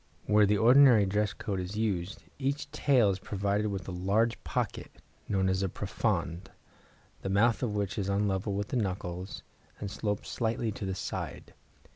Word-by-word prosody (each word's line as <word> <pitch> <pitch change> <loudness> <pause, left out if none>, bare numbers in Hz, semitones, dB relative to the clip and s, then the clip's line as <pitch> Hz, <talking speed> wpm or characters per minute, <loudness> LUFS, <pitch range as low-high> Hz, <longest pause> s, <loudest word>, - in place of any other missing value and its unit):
Where 105 -1 +5
the 105 +1 +3
ordinary 120 -1 +7
dress 105 +1 0
coat 105 -4 -4
is 90 +3 -5
used, 100 -3 -2 0.2
each 140 +2 -2
tail 125 -8 +3
is 95 - -3
provided 100 +2 -1
with 100 -3 -4
a - - -4
large 100 +6 0
pocket, - - -3 0.4
known 95 -2 +2
as 95 0 +1
a 95 - 0
profonde, 85 +1 -2 0.7
the 95 - -3
mouth 110 +4 +3
of 115 -5 -1
which 100 -3 -2
is 100 -1 -2
on 100 +1 +1
a - - +1
level 100 +1 -1
with 100 +1 -2
the - - -1
knuckles, 95 -3 -3 0.4
and 100 - -5
slopes 105 -1 -3
slightly 115 -1 -1
to 100 -1 -5
the 95 - -2
side. 90 - -5
100 Hz, 180 wpm, -30 LUFS, 95-110 Hz, 0.7 s, ordinary